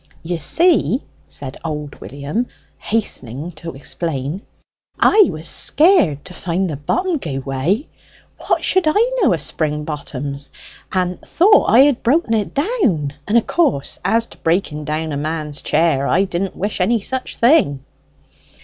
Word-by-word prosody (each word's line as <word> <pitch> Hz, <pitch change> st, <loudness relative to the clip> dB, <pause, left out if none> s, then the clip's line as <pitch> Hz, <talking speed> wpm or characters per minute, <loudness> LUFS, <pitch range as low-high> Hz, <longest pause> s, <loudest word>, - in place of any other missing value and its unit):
"You 170 Hz, 0 st, -3 dB
see," 325 Hz, -, +3 dB, 0.2 s
said 135 Hz, -1 st, -8 dB
old 150 Hz, -3 st, -5 dB
William, 140 Hz, -, -3 dB, 0.3 s
hastening 160 Hz, -, -3 dB
to 165 Hz, -1 st, -8 dB
explain, 145 Hz, +3 st, -4 dB, 0.6 s
"I 420 Hz, -2 st, +6 dB
was 155 Hz, +1 st, -5 dB
scared 295 Hz, -, +3 dB
to -, -, -9 dB
find 180 Hz, +2 st, -1 dB
the 155 Hz, -, -3 dB
bottom 335 Hz, -, -1 dB
gie 140 Hz, -, -4 dB
way 135 Hz, -, -1 dB, 0.5 s
what -, -, 0 dB
should 375 Hz, -3 st, +2 dB
I 435 Hz, +10 st, +3 dB
know 375 Hz, -, +4 dB
o' 175 Hz, -, +2 dB
spring 150 Hz, 0 st, -2 dB
bottoms? 140 Hz, -2 st, -5 dB, 0.4 s
and 180 Hz, -1 st, -1 dB
thought 410 Hz, +5 st, +4 dB
I 235 Hz, -, +7 dB
had 280 Hz, -3 st, +4 dB
broke 270 Hz, +1 st, +2 dB
it 215 Hz, -3 st, 0 dB
down: 270 Hz, -, 0 dB
and 215 Hz, +4 st, +3 dB
of 235 Hz, -, +2 dB
course 145 Hz, -, 0 dB
as 230 Hz, 0 st, +2 dB
to -, -, -16 dB
breaking 160 Hz, -3 st, -1 dB
down 155 Hz, +1 st, -2 dB
a 140 Hz, -, -2 dB
man's 150 Hz, 0 st, -4 dB
chair, 150 Hz, -5 st, +1 dB
I 190 Hz, -, +3 dB
didn't 190 Hz, 0 st, -3 dB
wish 205 Hz, 0 st, -3 dB
any 230 Hz, +5 st, +2 dB
such 260 Hz, +5 st, -4 dB
thing." 230 Hz, -, +3 dB
170 Hz, 150 wpm, -19 LUFS, 145-240 Hz, 0.6 s, I